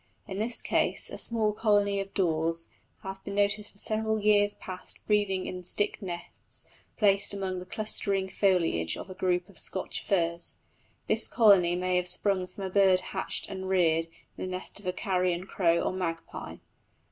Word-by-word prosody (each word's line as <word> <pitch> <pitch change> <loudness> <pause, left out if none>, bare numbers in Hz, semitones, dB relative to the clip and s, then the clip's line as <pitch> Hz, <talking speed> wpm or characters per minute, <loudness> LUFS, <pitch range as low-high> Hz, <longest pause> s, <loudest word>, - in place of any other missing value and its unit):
In 195 -1 -5
this 230 +2 +2
case - - +1
a - - -6
small 220 -2 +1
colony 205 -2 +2
of 195 0 -5
daws 165 -2 +1 0.3
have 195 0 -7
been 200 - -6
noticed 205 +1 +1
for - - -23
several 220 +1 +2
years 205 -1 +4
past 185 -1 -8
breeding 205 -3 +1
in 180 - -5
stick 205 +5 0
nests 175 -3 -6 0.3
placed 200 -2 +3
among 190 -2 -3
the 180 - -10
clustering 200 -2 +1
foliage 170 - +1
of 190 - -8
a - - -5
group 180 -1 0
of 200 - -11
Scotch 185 - -3
firs. 170 -3 0 0.5
This - - +3
colony 195 -7 +5
may 180 0 0
have 180 0 0
sprung 190 -1 +2
from 190 +2 -9
a 190 - -4
bird 190 -1 +4
hatched - - -2
and 190 -1 -6
reared 165 -3 +2 0.3
in - - -5
the 185 - -4
nest 185 - -5
of 200 - -10
a - - +2
carrion 180 -2 -1
crow 170 -3 +1
or - - -1
magpie. 170 -3 -5
190 Hz, 175 wpm, -28 LUFS, 180-205 Hz, 0.5 s, colony